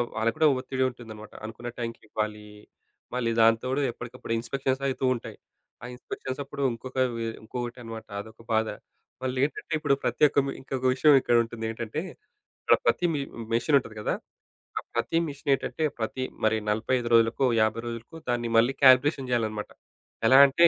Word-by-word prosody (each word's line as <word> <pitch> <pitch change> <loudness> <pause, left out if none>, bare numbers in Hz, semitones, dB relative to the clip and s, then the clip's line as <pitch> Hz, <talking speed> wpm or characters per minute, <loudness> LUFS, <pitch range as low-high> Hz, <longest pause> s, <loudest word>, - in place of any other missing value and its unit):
వాళ్లకి 110 +1 +1
కూడా 160 -1 +5
ఒత్తిడి 130 0 -1
ఉంటుందన్నమాట 110 -4 -11
అనుకున్న 115 +2 -6
టైం‌కి 115 -1 -4
ఇవ్వాలి 105 0 -3 0.7
మళ్ళీ 120 -2 0
దాంతోడు 115 +5 +3
ఎప్పటికప్పుడు 120 -1 -6
ఇన్‌స్పెక్షన్స్ 130 +3 -1
అయితూ 135 0 -1
ఉంటాయి. 120 - -8 0.5
ఆ - - -5
ఇన్‌స్పెక్షన్స్ 130 +1 -6
అప్పుడు 140 0 -7
ఇంకొక 125 +3 -9 0.2
వె 115 - -2 0.2
ఇంకొకటి 120 +2 -5
అనమాట 115 -1 -8
అదొక 110 +2 -14
బాధ. 110 0 +2 0.6
మళ్ళేంటంటే 130 +5 -1
ఇప్పుడు 145 -3 +2
ప్రత్యేక 150 -2 +3 0.3
ఇంకొక 130 -1 -4
విషయం 150 +3 +5
ఇక్కడ 120 - +2
ఉంటుంది 115 -1 -6
ఏంటంటే 115 +5 -4 0.6
అక్కడ - - +5
ప్రతి 180 - +3
మి 150 - -1 0.3
మిషిన్ 130 +6 +3
ఉంటది 115 -4 -11
గదా! - - 0 0.6
ఆ - - 0
ప్రతి 120 +7 0
మిషినేంటంటే 140 +2 -1 0.2
ప్రతి 115 +3 -2 0.2
మరి 110 0 +3
45 120 +3 0
రోజులకో, 115 +3 +4 0.2
50 110 +1 +1
రోజులకో 115 +7 -7
దాన్ని 120 -1 0
మళ్ళీ 120 +4 +4
కాలిక్యులేషన్ 130 +1 +6
జేయాలన్నమాట. 110 -3 -1 0.6
ఎలా 130 +3 +8
అంటే 170 +5 +5
120 Hz, 150 wpm, -27 LUFS, 115-135 Hz, 0.7 s, ఎలా